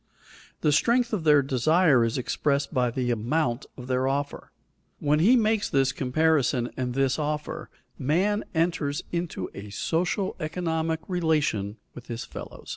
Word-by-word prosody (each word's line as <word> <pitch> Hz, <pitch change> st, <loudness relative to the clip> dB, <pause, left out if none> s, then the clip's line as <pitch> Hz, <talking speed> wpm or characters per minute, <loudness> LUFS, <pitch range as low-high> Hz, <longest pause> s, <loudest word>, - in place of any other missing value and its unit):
The 150 Hz, -, +3 dB
strength 235 Hz, -, +2 dB
of 180 Hz, -7 st, -1 dB
their 150 Hz, -2 st, +6 dB
desire 140 Hz, +1 st, +3 dB
is 115 Hz, +2 st, 0 dB
expressed 140 Hz, +3 st, -1 dB
by 125 Hz, -3 st, +2 dB
the 125 Hz, +1 st, -1 dB
amount 120 Hz, +3 st, -1 dB
of 125 Hz, -, -8 dB
their 130 Hz, +1 st, 0 dB
offer. 140 Hz, +1 st, -3 dB, 0.5 s
When 150 Hz, +1 st, +1 dB
he 215 Hz, +10 st, +6 dB
makes 220 Hz, -3 st, +2 dB
this 135 Hz, -1 st, +2 dB
comparison 135 Hz, -2 st, +1 dB
and 125 Hz, -1 st, -3 dB
this 135 Hz, +1 st, +1 dB
offer, 150 Hz, 0 st, -3 dB, 0.3 s
man 190 Hz, +10 st, +1 dB
enters 160 Hz, -2 st, 0 dB
into 170 Hz, -, -3 dB
a 100 Hz, +1 st, -8 dB
social, 175 Hz, -, -1 dB
economic 160 Hz, 0 st, -2 dB
relation 150 Hz, -, 0 dB, 0.2 s
with 125 Hz, -, -11 dB
his 120 Hz, 0 st, -5 dB
fellows. -, -, -10 dB
150 Hz, 145 wpm, -26 LUFS, 125-165 Hz, 0.5 s, their